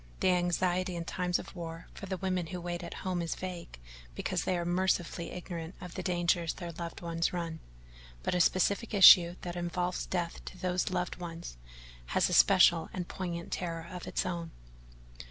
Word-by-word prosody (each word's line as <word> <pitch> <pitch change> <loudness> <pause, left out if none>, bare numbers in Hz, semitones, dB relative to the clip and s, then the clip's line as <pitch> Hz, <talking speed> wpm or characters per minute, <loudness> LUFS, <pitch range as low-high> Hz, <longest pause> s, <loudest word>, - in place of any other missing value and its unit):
The - - +3
anxiety 180 +1 +1
in 170 -1 -4
times 180 0 0
of - - -9
war 165 -1 -6
for 200 - -8
the 190 0 -2
women 185 -2 -1
who 180 +1 -5
wait 175 0 -4
at 170 - -7
home 180 -2 0
is 165 - -2
vague 180 - -7 0.4
because - - -1
they 185 - +1
are 170 - -2
mercifully 175 -1 0
ignorant 170 -1 -6
of 180 - -8
the - - -4
dangers 175 -2 +1
their 175 -2 -6
loved 170 0 -7
ones 170 0 -1
run, 165 -2 -3 0.6
but - - 0
a 180 - +3
specific 200 +6 +2
issue 175 -3 +9
that 175 -1 -5
involves 175 +1 -2
death 175 -2 -3
to - - -8
those 180 0 0
loved 180 -1 -2
ones 170 - -7 0.6
has - - +4
a - - -1
special 160 - +6
and 180 -2 -4
poignant 170 -3 -5
terror 165 -2 -3
of 180 -1 -7
its - - -1
own. 170 -2 -3
175 Hz, 185 wpm, -31 LUFS, 170-180 Hz, 0.6 s, issue